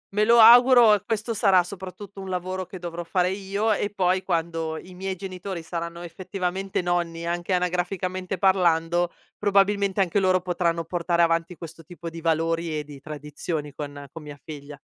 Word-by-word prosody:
Me 210 - +3
lo 235 +2 +5
auguro 240 0 +8
e 205 - +2
questo 225 +1 -2
sarà 195 -4 +4
soprattutto 195 +2 -9
un 190 - -7
lavoro 185 0 -3
che 190 - -9
dovrò 175 -1 -6
fare 180 +1 0
io 200 +3 -1
e 205 +1 -1
poi 185 -2 +1
quando 165 -3 -2
i 185 - -11
miei 190 +1 -4
genitori 185 -1 -6
saranno 170 +1 -5
effettivamente 185 +2 -3
nonni, 170 -1 -1
anche 175 +2 -3
anagraficamente 180 +1 -2
parlando, 175 -2 +2 0.3
probabilmente 200 -1 +2
anche 185 +1 +1
loro 185 -1 +3
potranno 170 -2 -1
portare 170 0 0
avanti 165 +1 0
questo 165 -1 -10
tipo 170 +1 -9
di 165 0 -8
valori 165 0 0
e 150 - -3
di 145 -1 -12
tradizioni 150 0 -5
con 145 -1 -7
con 165 - -8
mia 145 -1 -10
figlia. 145 -2 -9
180 Hz, 170 wpm, -25 LUFS, 165-195 Hz, 0.3 s, auguro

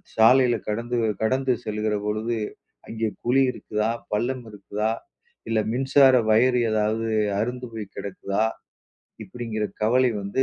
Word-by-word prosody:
சாலையில 120 +2 +5
கடந்து 120 +3 -2 0.2
கடந்து 130 +4 +1
செல்லுகிற 105 0 -1
பொழுது, 110 +2 -1 0.5
அங்கே 110 0 -2 0.2
குழி 130 +3 +3
இருக்குதா? 105 -2 -2 0.2
பள்ளம் 125 +4 -1
இருக்குதா? 105 +1 -2 0.6
இல்ல 115 -1 +2
மின்சார 135 +2 +5 0.2
வயறு 125 +3 +4
ஏதாவது 110 +1 0 0.3
அறுந்து 125 +3 -2
போய் 105 -3 -7
கிடக்குதா?" 100 +1 -2 0.8
இப்படிங்கிற 115 -3 -4 0.2
கவலை 125 +3 +3
வந்து 100 +7 0
115 Hz, 115 wpm, -24 LUFS, 105-125 Hz, 0.8 s, சாலையில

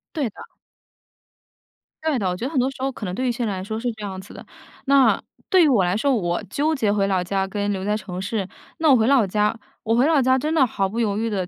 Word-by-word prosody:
对 285 -7 0
的。 - - -14 1.6
对 315 -4 +1
的， 200 -5 -1
我 180 - -1
觉 230 - -5
得 - - -2
很 275 - +1
多 260 +2 +2
时 - - -13
候 270 +1 -1
可 230 - -7
能 180 - -4
对 255 +6 -1
一 - - +2
些 240 0 -2
人 205 - -1
来 185 -1 -5
说 220 +3 -4
是 245 +1 -2
这 215 -1 -10
样 190 -2 -5
子 190 - -12
的。 - - -10 0.4
那， 275 -1 +4 0.3
对 375 -3 +5
于 - - +5
我 235 -10 +3
来 180 +2 0
说， 275 +5 +1
我 175 -5 -1
纠 305 +7 0
结 220 -8 +1
回 200 -1 +1
老 185 -2 +1
家 195 +1 -1
跟 205 +1 -2
留 190 -1 -3
在 210 0 +1
城 190 -3 -6
市。 200 -1 -2 0.3
那 320 -1 +3
我 270 - +7
回 220 - +2
老 265 -5 +4
家， 210 +3 0 0.3
我 225 0 +1
回 255 +5 +4
老 315 -3 +4
家 260 +1 +3
真 300 +4 -2
的 310 -5 +4
毫 195 -5 -1
不 225 +4 -4
犹 210 -3 +1
豫 225 +1 -1
的 190 -4 -2
220 Hz, 300 characters per minute, -22 LUFS, 195-265 Hz, 1.6 s, 我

